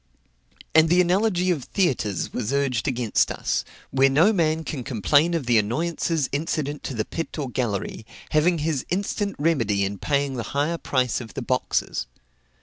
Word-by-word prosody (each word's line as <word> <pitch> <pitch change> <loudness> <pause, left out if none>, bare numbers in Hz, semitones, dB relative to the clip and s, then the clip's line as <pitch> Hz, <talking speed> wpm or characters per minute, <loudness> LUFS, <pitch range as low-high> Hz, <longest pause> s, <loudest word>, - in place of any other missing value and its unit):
And 160 0 +6
the 175 +2 +4
analogy 180 0 +2
of 150 -7 -1
theatres 125 - -1
was 115 -1 -2
urged 140 -5 0
against 120 -4 +1
us, - - -1 0.3
where 135 0 +4
no 165 +11 +4
man 160 -3 +1
can 140 -5 -5
complain 145 - +2
of 160 -6 -2
the 120 -2 +4
annoyances 155 +6 -1
incident 145 0 -2
to 135 - -4
the 110 - -1
pit 165 0 -5
or 140 -5 -3
gallery, 110 -3 -2 0.3
having 165 +3 +3
his 150 -3 -1
instant 200 +2 -1
remedy 115 -11 +1
in 100 0 -4
paying 140 -1 0
the - - -1 0.2
higher 165 +4 0
price 125 -3 0
of 110 -6 -10
the - - -3
boxes. - - -1
145 Hz, 165 wpm, -24 LUFS, 125-165 Hz, 0.3 s, And